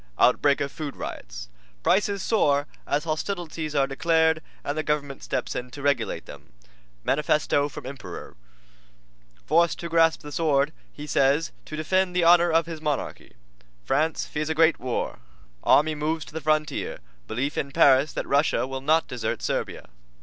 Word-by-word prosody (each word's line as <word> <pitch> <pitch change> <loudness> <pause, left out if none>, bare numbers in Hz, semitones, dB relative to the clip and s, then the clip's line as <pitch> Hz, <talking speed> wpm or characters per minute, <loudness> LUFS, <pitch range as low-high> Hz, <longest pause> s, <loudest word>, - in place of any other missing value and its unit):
OUTBREAK 140 +3 +4
OF 140 -1 -2
FOOD 150 -3 -6
RIOTS - - -7 0.4
Prices 200 0 +2
Soar 145 -10 +2 0.2
as 145 +1 0
Hostilities 160 -2 -3
Are 140 -1 +4
Declared 160 +3 +2 0.2
and 145 - -2
the 155 - 0
Government 145 -3 -2
Steps 125 - -3
in 125 0 -4
to 140 +3 -10
Regulate 140 -5 0
Them. - - -13 0.5
MANIFESTO 145 0 +1
FROM 135 - -9
EMPEROR 135 - -8 1.1
Forced 170 - +3
to 170 - -5
Grasp 165 -1 +3
the 150 - -9
Sword, 150 -2 +1 0.2
He 150 - -9
Says, 140 +2 +2
to 155 - -7
Defend 185 +3 +1
the 180 - +3
Honor 175 +1 +6
of 165 0 +3
His 165 -2 -7
Monarchy. 150 -3 -3 0.5
FRANCE 155 +4 +1
FEARS 150 0 -3
A 160 - 0
GREAT 160 0 +4
WAR 125 0 -3 0.4
Army 155 +2 +4
Moves 155 +1 -2
to - - -14
the 160 - -4
Frontier 155 0 0 0.3
Belief 135 +6 -2
in 140 - -2
Paris 135 +2 +5
That - - -4
Russia 140 0 +2
Will 135 0 -5
Not 155 +4 +2
Desert 115 -3 -3
Servia. - - -3
150 Hz, 160 wpm, -25 LUFS, 140-160 Hz, 1.1 s, Honor